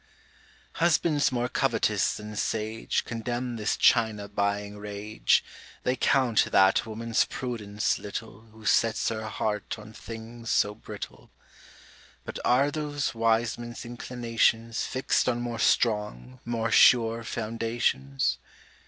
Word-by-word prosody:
Husbands 160 -4 +3
more 120 -1 0
covetous - - +1
than 105 0 -8
sage 110 +1 -1
Condemn 120 +1 -3
this 105 -1 0
China 110 -4 +3
buying 100 0 -2
rage; 105 +1 0 0.4
They 125 - +1
count 130 -3 +3
that 95 +4 +4
woman's 115 +1 0
prudence 110 -5 -2
little, 110 +2 -7
Who 110 0 -15
sets 115 +2 +2
her 110 -1 -4
heart 105 -1 -2
on 110 0 -12
things 115 +1 -9
so 105 - +2
brittle. 110 - -9 1.0
But - - -6
are 135 +4 +3
those 145 -1 -2
wise 115 0 +1
men's 120 +1 -7
inclinations 115 -1 0
Fixt 130 0 +1
on 120 -1 0
more 120 -1 -4
strong, 85 - +1
more 115 -1 -1
sure 115 -1 +5
foundations? 110 - -1
115 Hz, 120 wpm, -27 LUFS, 105-120 Hz, 1.0 s, sure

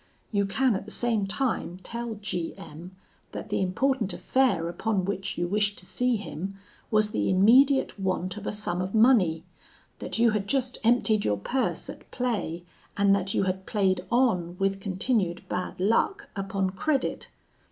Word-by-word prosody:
You 200 -2 +1
can 250 +3 +2
at 195 - -4
the - - -10
same 225 -5 +1
time 220 -5 -1
tell 235 -1 -4
G 180 -5 -4
M, 170 +5 -11 0.4
that - - -6
the - - 0
important 230 +3 0
affair 240 -11 +1
upon 190 +2 -1
which 195 0 -3
you 175 0 0
wished 205 +2 0
to 180 - -11
see 250 +5 +1
him 195 -2 -5 0.3
was 215 -1 +3
the - - 0
immediate 245 +7 +4
want 185 -1 -1
of 210 -1 -7
a - - 0
sum 185 -4 -2
of 185 +3 -3
money; 215 -9 +4 0.6
that - - -4
you 230 0 +4
had 210 -2 -1
just 260 -1 0
emptied 225 -2 +3
your 105 - +1
purse 255 - -2
at - - -10
play, 205 -9 -2 0.3
and 200 0 +4
that 195 0 -2
you - - +2
had 190 0 -2
played 190 -3 +1
on, 185 -9 +2
with 195 0 0
continued 190 -2 -1
bad 180 0 -4
luck, 230 - +1
upon 195 -1 -1
credit. 270 +8 -1
200 Hz, 170 wpm, -27 LUFS, 185-235 Hz, 0.6 s, immediate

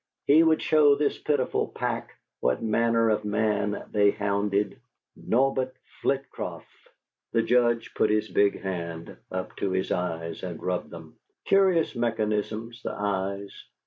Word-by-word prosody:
He 150 +3 +6
would 160 -1 +3
show 150 -2 +5
this 145 0 0
pitiful 145 -4 0
pack - - -4 0.2
what 65 - 0
manner 115 0 +2
of 105 - 0
man 105 -1 0
they 105 -1 +4
hounded! 100 +2 -1 0.3
Norbert 130 +1 0 0.3
Flitcroft.... 135 0 -2 0.7
The 115 -1 +3
Judge 120 -1 +2
put 110 - +2
his 105 0 +1
big 100 -1 +2
hand 85 -3 -5 0.2
up 95 0 -4
to 100 - -1
his 95 0 -1
eyes 85 -2 -2
and 85 -3 -5
rubbed 90 -1 -2
them. - - -11 0.3
Curious 190 -7 +3
mechanisms 110 0 -2
the - - -4
eyes.... 100 0 -2
110 Hz, 135 wpm, -26 LUFS, 100-125 Hz, 0.7 s, He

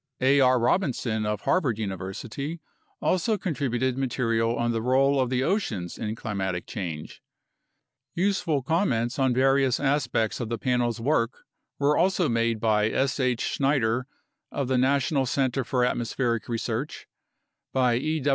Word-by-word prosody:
A. 135 +2 +4
R. 130 -1 +5
Robinson 120 - 0
of 105 0 -2
Harvard 140 - +1
University 110 - -5 0.4
also 210 +4 +1
contributed 130 - -1
material 115 -3 0
on 120 0 0
the 115 -1 -1
role 135 +3 +3
of 130 -2 +1
the 130 0 0
oceans 125 - -1
in 110 0 -3
climatic 95 -6 -3
change. 85 -7 -6 0.9
Useful 175 -6 0
comments 130 - 0
on 130 -1 +3
various 135 0 +3
aspects 135 -6 0
of 120 -3 -3
the 115 - -2
Panel's 120 -1 0
work 120 -1 0 0.3
were 145 +1 +2
also 180 0 +2
made 115 -2 +1
by 105 -1 +2
S. 135 +4 0
H. 125 -3 +1
Schneider 130 -3 +1 0.4
of 140 -3 -2
the 130 0 +1
National 135 +1 +2
Center 135 0 0
for 125 0 +1
Atmospheric 120 -1 -1
Research; 115 +4 -3 0.7
by 125 -2 +2
E. 155 +3 -1
125 Hz, 140 wpm, -26 LUFS, 115-140 Hz, 0.9 s, R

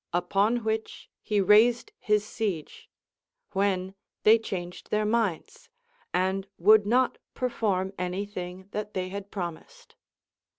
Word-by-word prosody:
Upon 200 +7 +1
which 220 0 -3
he 210 -1 0
raised 225 - +4
his 210 -1 +1
siege; 200 -9 -4 0.6
when 190 -1 0 0.3
they 225 +2 +7
changed 180 -5 -6
their 210 0 +1
minds, 230 - -1 0.4
and 190 +1 0
would 210 +3 +6
not 250 +3 +2 0.2
per 255 - -1
form 190 -4 -1
any 180 +2 -2
thing 185 -1 -7
that 210 0 -5
they 185 -1 -2
had 200 +1 -6
promised. 200 - -7
205 Hz, 125 wpm, -27 LUFS, 185-220 Hz, 0.6 s, they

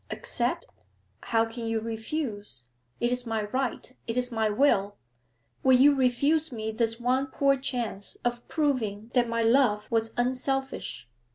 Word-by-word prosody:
'Accept? - - -1 0.6
How 225 -1 +2
can 230 0 -6
you 225 0 0
refuse? 220 - -4 0.4
It 240 +1 +1
is 250 -1 -1
my 220 -1 -1
right, 255 +4 -3
it 230 +1 -2
is 250 0 +1
my 220 -2 +1
will! 205 -4 +2 0.6
Would 260 -1 +5
you 285 +2 +7
refuse 280 +4 +2
me 220 -2 -3
this 225 +1 0
one 255 +3 +1
poor 275 +1 +2
chance 240 -6 -3
of 240 0 -2
proving 235 -8 -1
that 245 -2 +3
my 230 0 0
love 225 -3 +3
was 225 -1 +1
unselfish? 255 - -2
240 Hz, 150 wpm, -27 LUFS, 220-265 Hz, 0.6 s, you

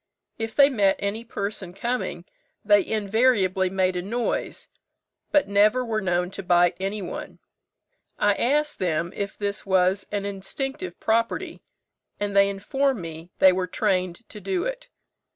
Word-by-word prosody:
If 225 0 -4
they 280 -1 +8
met 200 -6 +3
any 200 +3 -3
person 200 -5 -5
coming, 235 -6 -3 0.4
they 205 -1 +5
invariably 205 -3 +2
made 185 -1 +1
a 180 - -1
noise, 230 +6 -2 0.6
but 295 -6 +3
never 210 +5 +3
were 220 -2 -1
known 180 -1 0
to 195 - -6
bite 175 -1 +3
any 195 +1 -3
one. - - -7 0.8
I 205 - +3
asked 295 +7 +1
them 170 -1 -1
if 200 -1 -4
this 205 0 -3
was 190 0 +2
an 205 -1 -2
instinctive 270 - -4
property, 230 +1 -1 0.6
and 205 -1 -2
they 200 0 +6
informed 260 +6 0
me 165 0 -8
they 190 - +7
were 185 0 -1
trained 185 +1 -1
to 195 -3 -3
it. - - -5
200 Hz, 145 wpm, -25 LUFS, 185-225 Hz, 0.8 s, they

